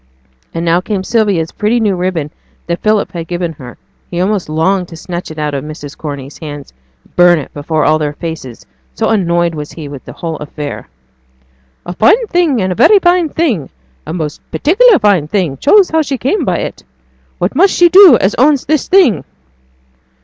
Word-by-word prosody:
And 165 Hz, +1 st, -4 dB
now 170 Hz, +1 st, +2 dB
came 195 Hz, -1 st, -3 dB
Sylvia's 200 Hz, -8 st, 0 dB
pretty 220 Hz, +3 st, 0 dB
new 210 Hz, -4 st, +1 dB
ribbon 175 Hz, -5 st, -2 dB, 0.3 s
that 170 Hz, 0 st, -3 dB
Philip 215 Hz, -1 st, +1 dB
had 170 Hz, -2 st, -6 dB
given 175 Hz, -1 st, -3 dB
her 125 Hz, -5 st, -12 dB, 0.3 s
(he 175 Hz, -, -4 dB
almost 190 Hz, -2 st, -1 dB
longed 180 Hz, +4 st, 0 dB
to 165 Hz, -, -11 dB
snatch 175 Hz, +1 st, -6 dB
it 155 Hz, -, -10 dB
out 150 Hz, -1 st, -2 dB
of 135 Hz, -1 st, -3 dB
Mrs. 150 Hz, -1 st, -9 dB
Corney's 140 Hz, -2 st, -7 dB
hands 145 Hz, -3 st, -9 dB, 0.3 s
and -, -, -29 dB
burn 175 Hz, -1 st, +5 dB
it 145 Hz, -, -7 dB
before 155 Hz, +1 st, -1 dB
all 155 Hz, 0 st, +3 dB
their 150 Hz, -1 st, -2 dB
faces, 150 Hz, -7 st, -7 dB, 0.3 s
so -, -, 0 dB
annoyed 175 Hz, -5 st, +1 dB
was 150 Hz, -1 st, -7 dB
he 155 Hz, -3 st, -8 dB
with 140 Hz, -2 st, -9 dB
the -, -, -10 dB
whole 165 Hz, -2 st, -5 dB
affair.) 150 Hz, -1 st, -7 dB, 1.0 s
'A 175 Hz, -, -5 dB
fine 415 Hz, -, +3 dB
thing 340 Hz, -, +1 dB
and 185 Hz, -, -1 dB
a -, -, +1 dB
very 410 Hz, -, +5 dB
fine 350 Hz, -3 st, +2 dB
thing 265 Hz, -, -1 dB, 0.4 s
a -, -, -4 dB
most 155 Hz, -4 st, -4 dB
particular 420 Hz, +7 st, +4 dB
fine 200 Hz, -, +2 dB
thing 165 Hz, -6 st, -1 dB
choose 385 Hz, -, +4 dB
how 320 Hz, 0 st, +2 dB
she 275 Hz, -3 st, -3 dB
came 280 Hz, -, -1 dB
by -, -, 0 dB
it. -, -, -5 dB, 0.5 s
What -, -, -1 dB
must 390 Hz, -, +3 dB
she 350 Hz, -, +5 dB
do 370 Hz, +1 st, +8 dB
as 190 Hz, -, +1 dB
owns 280 Hz, 0 st, +3 dB
this 310 Hz, -1 st, 0 dB
thing?' 270 Hz, -, +3 dB
175 Hz, 195 wpm, -13 LUFS, 155-240 Hz, 1.0 s, do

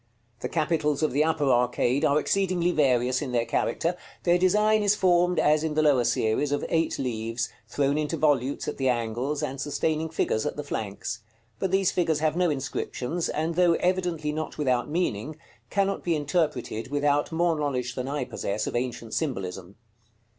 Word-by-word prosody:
The -, -, -4 dB
capitals 155 Hz, -2 st, 0 dB
of 155 Hz, -, +2 dB
the 145 Hz, +4 st, +3 dB
upper 160 Hz, -1 st, 0 dB
arcade 125 Hz, +2 st, +2 dB
are 145 Hz, -1 st, +4 dB
exceedingly 180 Hz, +1 st, +1 dB
various 130 Hz, -5 st, +2 dB
in 130 Hz, -4 st, -4 dB
their 120 Hz, -1 st, +2 dB
character; 170 Hz, +7 st, 0 dB, 0.3 s
their 175 Hz, 0 st, +3 dB
design 210 Hz, +4 st, +3 dB
is 205 Hz, 0 st, +3 dB
formed, 180 Hz, -2 st, +3 dB
as 150 Hz, +1 st, +3 dB
in 155 Hz, -1 st, -2 dB
the 155 Hz, -, +3 dB
lower 135 Hz, -5 st, +4 dB
series, 120 Hz, +4 st, +1 dB
of 145 Hz, -, -1 dB
eight 165 Hz, -1 st, +1 dB
leaves, 115 Hz, -2 st, -2 dB, 0.2 s
thrown 140 Hz, +1 st, 0 dB
into 155 Hz, +2 st, -2 dB
volutes 140 Hz, -3 st, +1 dB
at -, -, -3 dB
the 130 Hz, -1 st, +1 dB
angles, 120 Hz, +4 st, -1 dB
and 135 Hz, +1 st, -3 dB
sustaining 155 Hz, +2 st, -1 dB
figures 110 Hz, -8 st, 0 dB
at -, -, -2 dB
the 150 Hz, -, -4 dB
flanks; 110 Hz, -2 st, -4 dB, 0.4 s
but 190 Hz, -, 0 dB
these 190 Hz, 0 st, +2 dB
figures 165 Hz, -4 st, +1 dB
have 155 Hz, +1 st, 0 dB
no 180 Hz, -1 st, +2 dB
inscriptions, 140 Hz, +2 st, -3 dB
and 160 Hz, +2 st, -1 dB
though 175 Hz, 0 st, +4 dB
evidently 175 Hz, -4 st, 0 dB
not 155 Hz, +1 st, -4 dB
without 130 Hz, -3 st, 0 dB
meaning, 155 Hz, -, -1 dB, 0.3 s
cannot 195 Hz, 0 st, 0 dB
be 170 Hz, -2 st, +1 dB
interpreted 145 Hz, -7 st, -1 dB
without 145 Hz, +1 st, +1 dB
more 170 Hz, 0 st, +2 dB
knowledge 130 Hz, -5 st, -2 dB
than 125 Hz, 0 st, -4 dB
I 140 Hz, -1 st, -2 dB
possess 105 Hz, -1 st, -3 dB
of -, -, -4 dB
ancient 120 Hz, -2 st, -3 dB
symbolism. 95 Hz, -, -3 dB
150 Hz, 175 wpm, -26 LUFS, 125-165 Hz, 0.4 s, are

